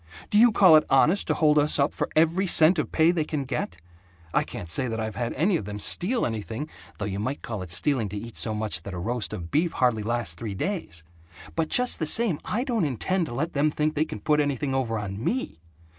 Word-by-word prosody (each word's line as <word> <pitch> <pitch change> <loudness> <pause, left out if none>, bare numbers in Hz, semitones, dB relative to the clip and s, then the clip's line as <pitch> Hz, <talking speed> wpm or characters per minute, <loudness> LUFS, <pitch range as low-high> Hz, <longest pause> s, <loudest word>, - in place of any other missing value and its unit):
Do 210 - +4
you 235 +1 +7
call 185 -6 +6
it 155 - +2
honest 160 +8 +3
to - - +1
hold 150 -1 +3
us 150 +1 +2
up 140 +1 +1
for - - -3
every 165 +5 +2
cent 165 0 +5
of - - -3
pay 160 +1 +4
they 170 -3 0
can 150 -2 -3
get? 125 -9 -4 0.6
I - - +3
can't 85 - -7
say 90 +10 0
that 115 -1 -3
I've 110 -1 -3
had 115 +2 -2
any 175 +6 +1
of - - -6
them 105 0 -6
steal 205 - +1
anything 115 +5 -4 0.3
(though 100 - -4
you 100 -1 -4
might 130 +7 -4
call 110 -4 -5
it 90 - -8
stealing 115 - +1
to 105 - -6
eat 115 +2 -8
so 110 -2 0
much 105 0 -1
that 100 - -8
a - - -5
roast 115 +4 -2
of 85 -1 -7
beef 165 +3 +1
hardly 120 -4 +1
lasts 115 -5 -2
three 100 +3 -6
days), 95 - -4 0.5
but 165 -1 0
just 250 0 +2
the 160 - -1
same 215 -5 +2
I 235 +4 -2
don't 240 - -1
intend 165 - -1
to 120 - -7
let 160 +6 -2
them 150 +2 +2
think 150 +1 -1
they 155 - +1
can 105 -9 -8
put 150 -1 +2
anything 140 -2 -1
over 125 -4 -1
on 105 +1 -5
ME! 250 - -2
140 Hz, 245 wpm, -25 LUFS, 110-165 Hz, 0.6 s, you